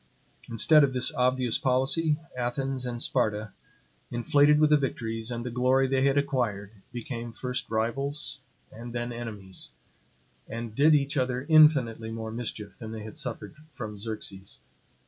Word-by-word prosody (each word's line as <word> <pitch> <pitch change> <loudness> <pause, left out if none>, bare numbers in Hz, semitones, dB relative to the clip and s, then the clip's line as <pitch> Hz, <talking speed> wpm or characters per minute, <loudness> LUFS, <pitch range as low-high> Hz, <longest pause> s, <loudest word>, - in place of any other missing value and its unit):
Instead 150 +7 +5
of 135 -2 +2
this 130 +5 +1
obvious 125 -3 +1
policy, 140 +4 +2 0.2
Athens 130 +1 -2
and 120 0 -3
Sparta, 110 -4 0 0.6
inflated 145 +5 +4
with 155 0 +4
the - - +8
victories 115 -4 -3
and 120 0 -4
the 125 - -3
glory 130 +2 +3
they 135 0 +1
had 140 0 +3
acquired, 120 -8 -1 0.2
became 120 -1 -5
first 125 +2 -4
rivals 135 +6 -1 0.3
and 120 +1 -9
then 120 0 -3
enemies; 105 -6 -6 0.8
and 115 -1 -6
did 150 +6 +5
each 140 0 +1
other 130 0 0
infinitely 140 -8 +5
more 110 0 -5
mischief 110 -4 -6
than 110 -2 -7
they 110 -1 -6
had 110 - -9
suffered 110 -5 -5 0.2
from 110 -4 -6
Xerxes. 100 -2 -5
120 Hz, 145 wpm, -28 LUFS, 115-135 Hz, 0.8 s, the